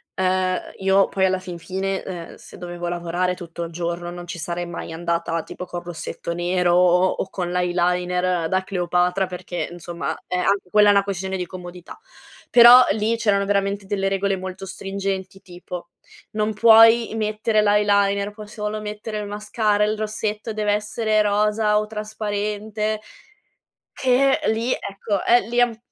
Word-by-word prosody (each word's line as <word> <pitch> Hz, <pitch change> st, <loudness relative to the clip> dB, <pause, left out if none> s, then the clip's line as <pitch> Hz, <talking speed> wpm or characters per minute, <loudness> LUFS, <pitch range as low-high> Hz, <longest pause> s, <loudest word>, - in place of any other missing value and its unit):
uhm, 185 Hz, 0 st, +1 dB, 0.2 s
io 195 Hz, 0 st, +3 dB
poi 190 Hz, -1 st, +1 dB
alla 190 Hz, 0 st, +2 dB
fin 180 Hz, -2 st, -8 dB
fine, 190 Hz, +3 st, -3 dB
uhm, 175 Hz, -3 st, -7 dB
se -, -, -13 dB
dovevo 175 Hz, -1 st, -6 dB
lavorare 175 Hz, +1 st, -1 dB
tutto 170 Hz, -1 st, -9 dB
il 170 Hz, -, -6 dB
giorno 175 Hz, +1 st, -4 dB
non 175 Hz, 0 st, -8 dB
ci 170 Hz, 0 st, -7 dB
sarei 175 Hz, +2 st, -3 dB
mai 170 Hz, -1 st, -7 dB
andata 165 Hz, 0 st, -2 dB
tipo, 180 Hz, -, -8 dB
col 175 Hz, 0 st, -6 dB
rossetto 170 Hz, 0 st, -6 dB
nero 175 Hz, 0 st, +1 dB
o 180 Hz, +1 st, +4 dB
o 190 Hz, -, -3 dB
con 180 Hz, -2 st, -4 dB
l'eyeliner 180 Hz, -1 st, 0 dB
da 185 Hz, +1 st, +1 dB
Cleopatra 180 Hz, 0 st, 0 dB
perché, 180 Hz, -1 st, -5 dB
insomma, 175 Hz, 0 st, -5 dB
eh, -, -, -3 dB
anche 195 Hz, +1 st, 0 dB
quella 210 Hz, 0 st, +5 dB
è -, -, +7 dB
una 200 Hz, -1 st, +4 dB
questione 190 Hz, -1 st, -3 dB
di 180 Hz, -, -3 dB
comodità. 175 Hz, -1 st, -10 dB, 0.5 s
Però, 245 Hz, +1 st, +9 dB
lì 220 Hz, +3 st, 0 dB
c'erano 200 Hz, -3 st, +1 dB
veramente 200 Hz, 0 st, 0 dB
delle 195 Hz, -1 st, -1 dB
regole 195 Hz, 0 st, 0 dB
molto 185 Hz, +1 st, -7 dB
stringenti 195 Hz, 0 st, -5 dB
tipo, 175 Hz, -1 st, -9 dB, 0.4 s
non 215 Hz, 0 st, -1 dB
puoi 225 Hz, +2 st, +6 dB
mettere 215 Hz, 0 st, +1 dB
l' 210 Hz, -, +1 dB
eyeliner 200 Hz, -1 st, +2 dB
puoi 210 Hz, 0 st, -11 dB
solo 210 Hz, 0 st, -4 dB
mettere 210 Hz, +1 st, -6 dB
il 210 Hz, -, -5 dB
mascara, 210 Hz, 0 st, 0 dB
il 215 Hz, +1 st, 0 dB
rossetto 215 Hz, +1 st, -3 dB
dev'essere 215 Hz, +1 st, 0 dB
rosa 210 Hz, +1 st, +2 dB
o 210 Hz, -, +1 dB
trasparente 215 Hz, 0 st, -3 dB, 0.9 s
che 265 Hz, +2 st, +2 dB
lì, 225 Hz, +3 st, 0 dB
ecco, 200 Hz, -1 st, -2 dB
eh, 240 Hz, +1 st, +5 dB
lì 240 Hz, +1 st, 0 dB
an 240 Hz, -2 st, +1 dB
195 Hz, 160 wpm, -22 LUFS, 180-210 Hz, 0.9 s, Però